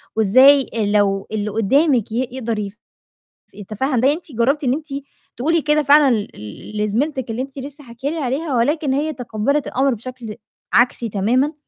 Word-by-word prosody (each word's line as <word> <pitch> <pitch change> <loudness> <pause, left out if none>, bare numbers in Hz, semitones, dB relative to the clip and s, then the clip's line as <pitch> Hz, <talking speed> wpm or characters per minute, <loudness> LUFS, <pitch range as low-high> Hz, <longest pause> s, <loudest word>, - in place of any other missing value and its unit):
وإزاي 255 +6 +5 0.2
لو 195 -2 +1
اللي 210 -1 -2
قُدّامِك 240 +3 +2
ي 245 +3 -1
يقدر 225 -5 -3 0.8
يتفاهم 225 +6 -2
ده، 270 +3 +4
أنتِ 325 -2 -9
جرّبتِ 265 +6 0
إن 250 - +2
أنتِ 305 +2 -5 0.5
تقولي 325 +7 +1
كده 300 0 +2
فعلًا 285 -1 +5
ل 210 -2 -3 0.5
ل 210 - 0
لزميلتِك 245 +3 -1
اللي 230 - -3
أنتِ 270 +1 -7
لسّه 285 +2 -9
حاكية 250 +3 -5
لي 330 - -4
عليها 280 +2 -2
ولكن 285 +3 +1
هي 300 +3 -1
تقبَّلِت 250 +3 -2
الأمر 270 +1 +1
بشكل 235 -1 -8 0.4
عكسي 240 -1 +2
تمامًا، 245 +9 +1
255 Hz, 160 wpm, -19 LUFS, 225-285 Hz, 0.8 s, وإزاي